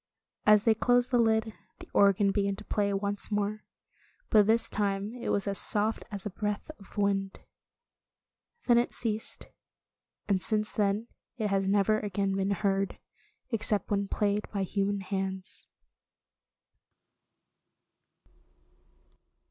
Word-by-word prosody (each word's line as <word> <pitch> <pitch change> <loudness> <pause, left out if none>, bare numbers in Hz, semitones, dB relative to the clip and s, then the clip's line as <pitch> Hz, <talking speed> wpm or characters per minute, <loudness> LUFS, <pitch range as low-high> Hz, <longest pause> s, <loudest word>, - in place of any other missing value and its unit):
As 210 -1 +6
they 225 - +5
closed 245 +3 +2
the 245 - +3
lid, 220 -1 +2 0.2
the - - -12
organ 200 0 +4
began 200 -1 0
to - - -10
play 205 -1 0
once 200 0 -1
more. 210 +1 -2 0.7
But 210 -2 +5
this 225 +1 +3
time 200 +1 -1
it 245 - -5
was 200 0 +1
as 200 -1 0
soft 215 +1 +3
as 200 -2 -5
a 210 - -3
breath 210 - -3
of 200 +2 -16
wind. 195 -1 0 1.3
Then 240 -1 +5
it 240 - -1
ceased, 220 -2 -1 0.8
and 195 -2 +1
since 215 +4 0
then 205 +1 0 0.3
it 215 -3 -1
has 195 -1 +1
never 205 +2 +2
again 200 -1 -1
been 195 0 0
heard, 195 0 0 0.5
except 210 -2 0
when 200 -1 0
played 205 0 -1
by 200 -2 -1
human 200 +1 -1
hands. 190 0 -5
205 Hz, 130 wpm, -29 LUFS, 195-215 Hz, 1.3 s, As